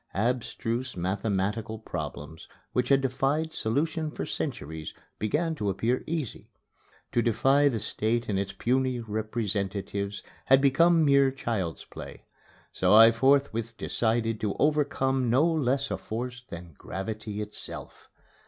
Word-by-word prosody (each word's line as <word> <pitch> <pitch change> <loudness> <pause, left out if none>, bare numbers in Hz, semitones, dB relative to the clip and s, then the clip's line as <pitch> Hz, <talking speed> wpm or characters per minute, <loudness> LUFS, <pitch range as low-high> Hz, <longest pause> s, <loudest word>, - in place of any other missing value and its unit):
Abstruse 120 +2 -1
mathematical 105 +4 -1
problems 80 -7 -6 0.3
which 125 -1 +1
had 135 -1 +5
defied 140 +4 0
solution 155 +7 0
for - - -5
centuries 80 - -4 0.2
began 155 +10 0
to 105 -10 -2
appear 115 +7 0
easy. 155 -7 -4 0.6
To 120 - +2
defy 135 +5 +3
the 125 -5 +1
State 115 +2 -1
and 100 -2 0
its 100 0 -2
puny 130 0 0
representatives 105 -2 -3 0.2
had 135 +1 +6
become 160 +4 +4
mere 140 -1 +5
child's 110 -10 -3
play. - - -10 0.5
So - - +3
I 115 +1 +9
forthwith 115 -2 +2
decided 115 -1 0
to 105 -2 -1
overcome 135 -4 +1
no 130 +7 +4
less 140 -4 +1
a - - -1
force 125 +2 -5
than 85 -1 -9
gravity 105 +2 -5
itself. 105 0 -5
115 Hz, 125 wpm, -28 LUFS, 105-135 Hz, 0.6 s, I